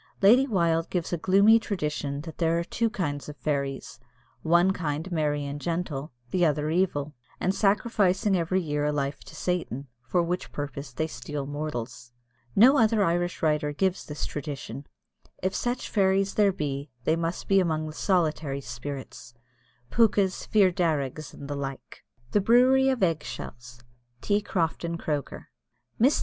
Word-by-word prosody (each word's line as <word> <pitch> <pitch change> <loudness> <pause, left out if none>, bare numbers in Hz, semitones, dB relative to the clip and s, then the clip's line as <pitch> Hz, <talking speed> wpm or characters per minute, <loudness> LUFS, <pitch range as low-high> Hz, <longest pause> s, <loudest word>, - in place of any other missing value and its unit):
Lady 245 +7 +7
Wilde 170 -7 +1
gives 175 -1 -2
a - - +1
gloomy 200 +6 +5
tradition 150 -9 -3
that 160 0 -10
there 165 -1 +2
are 170 - 0
two 230 +6 -1
kinds 145 - -3
of 150 - -9
fairies 140 -4 -3 0.4
one 175 +3 +4
kind 160 0 -3
merry 150 -3 0
and 140 +1 -5
gentle, 165 -4 -3 0.2
the 180 - +2
other 150 -1 +1
evil, 155 -5 0 0.3
and 185 - +1
sacrificing 200 -1 +2
every 180 +2 +1
year 150 -4 -1
a 150 - +2
life 140 -1 -2
to - - -13
Satan, 165 -7 -2 0.2
for 175 +8 +2
which 175 +2 -3
purpose 145 0 -5
they 145 +6 -1
steal 145 -1 -5
mortals. 135 -5 -5 0.4
No 260 +7 +7
other 220 -2 +4
Irish 175 0 0
writer 150 -1 +1
gives 190 +4 0
this 150 0 -5
tradition 140 -3 -6 0.6
if 190 +1 0
such 245 +3 -2
fairies 195 -1 +2
there 205 -2 +4
be, 140 -4 -4
they 160 - +2
must 165 +1 -3
be 195 -1 +5
among 160 -4 0
the 155 - -6
solitary 155 -6 0
spirits 125 -1 -7 0.6
Pookas, 200 -5 +2
Fir 200 -4 +4
Darrigs, 155 -5 -1
and 140 - -10
the 145 - -3
like. 135 -1 -7 0.3
THE 205 - +3
BREWERY 255 +5 +5
OF 260 -6 0
EGG 165 -4 +1
SHELLS. 120 +1 -8 0.4
T. 205 0 +1
CROFTON 170 -3 -1
CROKER. 150 -4 -4 0.5
Mrs. 265 +5 +5
165 Hz, 160 wpm, -27 LUFS, 145-190 Hz, 0.6 s, Lady